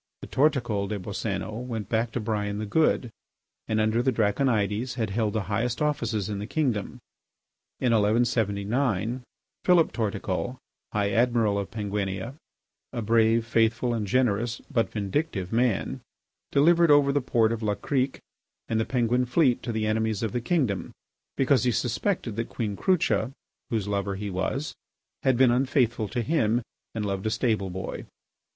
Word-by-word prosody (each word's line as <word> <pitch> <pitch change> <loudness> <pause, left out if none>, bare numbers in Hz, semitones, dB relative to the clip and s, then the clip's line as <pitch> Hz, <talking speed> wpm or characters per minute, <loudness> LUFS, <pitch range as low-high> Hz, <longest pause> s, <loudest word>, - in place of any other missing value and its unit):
The - - -8
Torticol 125 -9 +1
des 105 - -2
Boscénos 100 +3 -4
went 110 -5 -4
back 115 0 0
to - - -1
Brian 105 -2 -2
the 110 - -3
Good, 125 0 +2 0.6
and 110 0 +1
under 110 +2 +2
the 130 +1 +2
Draconides 110 0 +1
had 110 -5 -2
held 105 0 0
the 110 -2 -1
highest 110 +5 -1
offices 115 -9 0
in 105 -2 -3
the 105 - -5
kingdom. 125 -7 -1 0.8
In 125 - +2
1179, 110 +1 +1 0.4
Philip 175 -3 +4
Torticol, 110 +2 -2 0.3
High 100 -1 0
Admiral 115 -2 +2
of 100 - -4
Penguinia, 100 0 -3 0.6
a 120 -3 -3
brave, 115 +1 +3
faithful, 115 +1 +2
and 110 -3 -2
generous, 120 0 +1
but 115 - +1
vindictive 100 - -2
man, 120 -3 +1 0.5
delivered 170 +3 +5
over 145 -1 +6
the 145 - +2
port 115 -3 +2
of 115 -1 -3
La 105 -2 0
Crique 130 +2 -1 0.5
and 110 - 0
the 110 - +1
Penguin 125 0 +1
fleet 125 -1 +3
to 120 - -3
the 110 -1 -1
enemies 110 0 0
of 110 - -1
the 120 - -2
kingdom, 120 - 0 0.5
because 135 -2 +3
he 125 - +3
suspected 120 - -1
that 115 - -2
Queen 105 -4 -3
Crucha, 180 - +1 0.4
whose 110 -4 -1
lover 100 -1 -1
he 100 +1 -4
was, 130 +11 -2 0.5
had 130 -2 +2
been 130 -1 +5
unfaithful 125 -3 +1
to 120 +3 -2
him 120 -5 +1 0.3
and 110 -2 -2
loved 100 +1 -2
a - - +2
stable 110 -4 0
boy. 95 +1 -6
115 Hz, 160 wpm, -26 LUFS, 105-125 Hz, 0.8 s, over